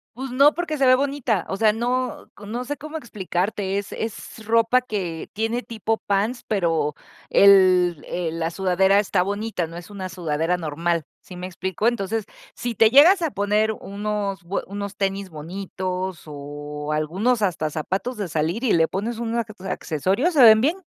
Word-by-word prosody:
Pues, 265 0 -6
no 280 +4 +5
porque 315 -4 -3
se 265 - +4
ve 255 - +7
bonita, 265 - 0
o 195 - -3
sea, 215 -1 +4
no 245 +2 -2
c 205 0 -11
no 240 +3 -4
sé 290 +3 -3
cómo 310 +2 -7
explicarte, 195 - -2
es 200 - -4
es 220 0 -6
ropa 230 +2 +4
que 185 -9 -4
tiene 225 +3 -1
tipo 225 -1 -2
pants, 205 +5 0
pero, 165 -7 0 0.3
el 185 -4 +5
el 165 -2 -3
la 165 0 0
sudadera 190 +2 +3
está 195 -3 +1
bonita, 205 -2 -2
no 165 +1 -9
es 175 +4 -10
una 190 -2 -6
sudadera 165 0 -1
normal, 165 +1 -1 0.2
¿sí 180 - -12
me 180 +1 -6
explico? 185 +4 -2
Entonces, 220 -2 -1 0.3
si 240 -1 -3
te 225 +1 +5
llegas 335 - +7
a 325 - +1
poner 210 +2 +1
unos 200 -1 -4
bue 180 +4 -3
unos 200 0 -6
tenis 195 -1 -2
bonitos, 185 +2 -5
o 145 0 -7
algunos 195 +10 0
hasta 155 -5 0
zapatos 190 - -3
de 200 -3 -3
salir 165 +9 -1
y 240 - +2
le 160 -1 +4
pones 225 +4 -3
un 235 0 -2
ac 225 -2 -2 0.2
accesorios, 190 - 0
se 280 - +4
ven 220 -1 +8
bien. 320 +8 +2
200 Hz, 180 wpm, -23 LUFS, 175-230 Hz, 0.3 s, ven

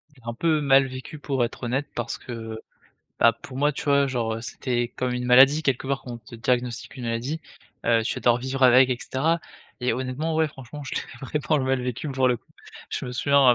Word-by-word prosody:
J'ai 125 - -20
un 120 - -3
peu 155 +3 +1
mal 135 -1 +5
vécu 130 +4 -8
pour 135 -4 0
être 120 - -4
honnête 135 +4 -1
parce 120 -1 -3
que, 115 -2 -7 0.6
bah, 115 - +6
pour 130 +3 -11
moi, 145 +2 +2
tu - - -6
vois, 140 -1 +4
genre, 115 -4 -1
heu, 115 - -5
c'était 120 +1 -2
comme 125 -1 -1
une 125 0 -2
maladie 135 +5 +7
quelque 135 -2 0
part, 140 0 -1
qu'on 120 -2 -7
te 115 - -14
diagnostique 125 +2 -1
une 125 - -6
maladie, 120 +7 -2 0.5
heu, 115 -1 +4
tu - - -1
vas - - -5
devoir 120 0 +4
vivre 130 +1 -3
avec 130 +1 +7
et 125 - +1
cetera 160 +7 0 0.4
et 125 -1 +1
honnêtement, 130 +6 -2
ouais 160 0 +3
franchement 145 0 -9
je - - -5
l'ai 135 +4 -4
vraiment 150 -1 +1
mal 130 -1 +1
vécu 125 +4 -3
pour 130 -1 +2
le 125 - +2
coup. - - -24 0.4
Je - - -3
me 125 - -5
souviens 140 +2 +3
130 Hz, 225 wpm, -25 LUFS, 120-140 Hz, 0.6 s, maladie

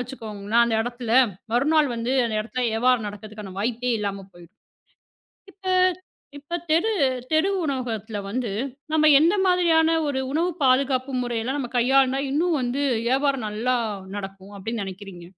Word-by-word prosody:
வச்சுக்கோங்கனா 225 -3 -3
அந்த 230 -1 -1
இடத்துல, 240 -1 -5 0.4
மறுநாள் 295 +4 +3
வந்து 235 +3 -2
அந்த 220 - -3
இடத்துல 250 +3 -4
வியாபாரம் 235 -1 +2
நடக்குறதுக்கான 205 -1 -9
வாய்ப்பே 245 +2 -1
இல்லாம 200 -1 -4
போயிடும். 175 +4 -17 0.9
இப்ப 380 -1 -16 0.7
இப்ப 295 +4 -8 0.2
தெரு 340 +8 +3 0.4
தெரு 315 +5 +3
உணவகத்துல 230 -6 -3
வந்து 245 -1 -2 0.4
நம்ம 310 0 +4
எந்த 340 +5 +4
மாதிரியான 330 -3 +3
ஒரு 265 -2 -1
உணவு 335 +4 +1
பாதுகாப்பு 260 0 +2
முறையிலாம் 240 +3 -2
நம்ம 245 -3 -4
கையாண்டா 265 +2 +3
இன்னும் 320 +2 +1
வந்து 255 +3 -1 0.2
வியாபாரம் 270 -2 +1
நல்லா 240 +4 0 0.4
நடக்கும் 195 0 -8
அப்படின்னு 220 +2 -4
நினைக்கிறீங்க? 190 -2 -9
245 Hz, 135 wpm, -24 LUFS, 215-280 Hz, 0.9 s, நம்ம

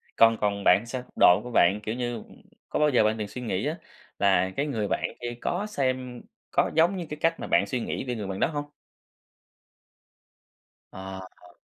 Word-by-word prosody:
Còn 115 0 +6
còn 100 -1 0
bạn 90 - +7
thì 115 - -11
sao? 125 +1 -5 0.2
Độ 90 +3 +7
của 125 - -7
bạn, 95 0 +4
kiểu 110 +2 -3
như, 120 -2 -3 0.5
có - - -1
bao 150 0 +4
giờ 125 -6 +4
bạn 110 +1 +2
từng 105 -2 -3
suy 125 +5 -8
nghĩ 110 -6 -2
á - - -2 0.4
là 95 -2 +3
cái 140 - +1
người 115 -8 -2
bạn - - -1 0.2
kia 120 0 -3
có 185 +4 -1
xem 130 - -2 0.3
có - - +2
giống 170 +4 +4
như 175 - -4
cái 150 - -5
cách 165 0 +1
mà - - -5
bạn 100 - +3
suy 125 - -2
nghĩ - - -3
về 125 -2 -3
người 105 -3 -5
bạn 95 0 -4
đó - - +3
hông? 145 -2 -5 2.2
Ờ, 95 0 -7 0.2
ờ. 90 -1 -19
120 Hz, 210 wpm, -26 LUFS, 100-135 Hz, 2.2 s, bạn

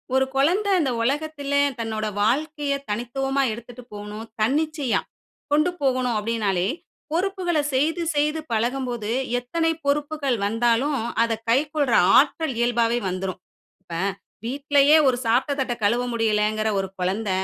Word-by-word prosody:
ஒரு 265 0 +4
குழந்தை 360 +10 +2
அந்த 280 -6 +1
உலகத்தில 285 +3 -2 0.3
தன்னுடைய 215 -2 -2
வாழ்க்கைய 290 +4 0 0.2
தனித்துவமா 270 +5 -1
எடுத்துட்டு 235 +2 -10
போணும், 210 +1 -7 0.2
தன்னிச்சையா 290 +2 +1 0.5
கொண்டு 305 +4 +3
போகணும் 255 -3 +1
அப்படினாலே, 205 -4 0 0.4
பொறுப்புகள 360 -2 0
செய்து 315 +6 +1
செய்து 300 +2 +1
பழகும்போது, 240 -1 -1 0.3
எத்தனை 325 +7 0
பொறுப்புக்கள் 285 -3 0
வந்தாலும் 240 +6 +1 0.3
அதைக் 225 -1 -2
கைக்கொள்ற 285 0 +1 0.2
ஆற்றல் 305 +1 +2
இயல்பாவே 240 0 +2
வந்துரும். 185 0 -4 0.4
இப்ப, 170 - -10 0.5
வீட்டிலேயே 285 +3 +4
ஒரு 255 -2 +3
சாப்ட்ட 245 +6 +2
தட்ட 250 -2 0
கழுவ 235 +4 +2
முடியலைன்கிற 215 -1 +1
ஒரு 190 - -2
குழந்த, 195 +4 -1
255 Hz, 115 wpm, -23 LUFS, 225-295 Hz, 0.5 s, ஒரு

